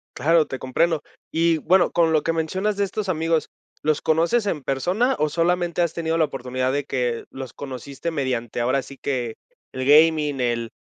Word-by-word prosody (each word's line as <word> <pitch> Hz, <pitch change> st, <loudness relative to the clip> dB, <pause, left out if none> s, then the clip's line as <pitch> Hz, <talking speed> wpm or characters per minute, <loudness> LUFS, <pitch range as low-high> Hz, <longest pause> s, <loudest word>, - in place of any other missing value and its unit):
Claro, 160 Hz, +3 st, +3 dB
te 130 Hz, -, -5 dB
comprendo. 150 Hz, +4 st, 0 dB, 0.3 s
Y, 165 Hz, 0 st, +2 dB
bueno, 185 Hz, +4 st, +3 dB
con 165 Hz, -2 st, +3 dB
lo 155 Hz, -2 st, +2 dB
que 165 Hz, -, 0 dB
mencionas 190 Hz, +6 st, -1 dB
de 200 Hz, -, +2 dB
estos 200 Hz, +1 st, -4 dB
amigos, 165 Hz, -1 st, 0 dB, 0.3 s
¿los 155 Hz, 0 st, +1 dB
conoces 170 Hz, +9 st, +2 dB
en 150 Hz, -8 st, -2 dB
persona 185 Hz, -, +1 dB
o 150 Hz, -, +2 dB
solamente 175 Hz, +1 st, 0 dB
has 170 Hz, -, -1 dB
tenido 165 Hz, -1 st, -1 dB
la 160 Hz, -, +4 dB
oportunidad 130 Hz, -1 st, -2 dB
de 145 Hz, -1 st, -1 dB
que 125 Hz, -4 st, -2 dB
los 130 Hz, -3 st, -8 dB
conociste 140 Hz, +3 st, -6 dB
mediante, 125 Hz, -6 st, -2 dB
ahora 130 Hz, +3 st, +1 dB
sí 140 Hz, +1 st, -12 dB
que, 125 Hz, -5 st, -3 dB, 0.4 s
el 130 Hz, 0 st, -3 dB
gaming, 150 Hz, -1 st, +4 dB
el 115 Hz, -1 st, -1 dB
155 Hz, 185 wpm, -23 LUFS, 130-170 Hz, 0.4 s, la